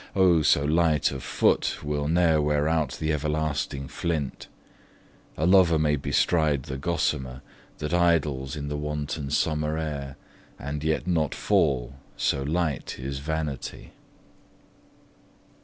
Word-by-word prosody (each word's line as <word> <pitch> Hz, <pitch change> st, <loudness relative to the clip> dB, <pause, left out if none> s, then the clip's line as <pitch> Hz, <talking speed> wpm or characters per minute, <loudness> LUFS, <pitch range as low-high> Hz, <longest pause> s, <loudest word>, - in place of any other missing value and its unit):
Oh, 90 Hz, -4 st, +5 dB
so 70 Hz, -1 st, +3 dB
light 80 Hz, 0 st, +2 dB
of 70 Hz, -1 st, -5 dB
foot -, -, +1 dB
Will 75 Hz, 0 st, -2 dB
ne'er 80 Hz, -1 st, +3 dB
wear 75 Hz, 0 st, +1 dB
out 80 Hz, -1 st, 0 dB
the 80 Hz, 0 st, -1 dB
everlasting 75 Hz, -2 st, -2 dB
flint: 75 Hz, -4 st, -3 dB, 0.9 s
A 80 Hz, -, 0 dB
lover 90 Hz, -3 st, +5 dB
may 75 Hz, -1 st, +2 dB
bestride 75 Hz, 0 st, +1 dB
the 65 Hz, +1 st, -5 dB
gossamer, 70 Hz, -5 st, -2 dB, 0.3 s
That 75 Hz, +3 st, -4 dB
idles 80 Hz, -6 st, +1 dB
in 70 Hz, -1 st, -5 dB
the 75 Hz, 0 st, -3 dB
wanton 75 Hz, -1 st, -3 dB
summer 75 Hz, +1 st, 0 dB
air, 70 Hz, -4 st, -4 dB, 0.4 s
And 70 Hz, +2 st, -5 dB
yet 80 Hz, +1 st, 0 dB
not 80 Hz, -5 st, 0 dB
fall, 65 Hz, -1 st, +1 dB, 0.2 s
so 70 Hz, -, 0 dB
light 75 Hz, 0 st, -2 dB
is 65 Hz, +1 st, -5 dB
vanity. 75 Hz, -2 st, -4 dB
75 Hz, 125 wpm, -26 LUFS, 70-80 Hz, 0.9 s, Oh